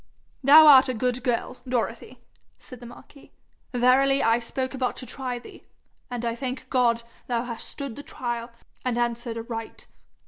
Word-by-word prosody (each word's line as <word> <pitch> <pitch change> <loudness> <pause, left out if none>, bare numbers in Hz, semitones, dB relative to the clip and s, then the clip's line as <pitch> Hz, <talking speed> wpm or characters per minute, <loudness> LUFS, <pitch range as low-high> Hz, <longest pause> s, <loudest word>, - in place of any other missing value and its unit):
'Thou 300 +4 +9
art 270 -3 +8
a 255 - -1
good 250 +2 -1
girl, 250 0 -1
Dorothy,' 240 0 -3 0.4
said 255 - -13
the 240 - -10
marquis. 270 +4 -15 0.4
'Verily 260 +3 +3
I 225 +1 +3
spoke 260 +3 -4
but 250 -1 -1
to 255 - -6
try 255 0 -4
thee, 240 - -13 0.5
and 240 -1 -4
I 230 - 0
thank 255 +1 -5
God 235 -2 +2 0.2
thou 240 -1 -1
hast 235 -2 -6
stood 275 -5 -6
the - - -8
trial, 240 -4 -5 0.3
and 250 -2 -1
answered 235 -1 -2
aright. 225 0 -7
245 Hz, 165 wpm, -25 LUFS, 235-260 Hz, 0.5 s, Thou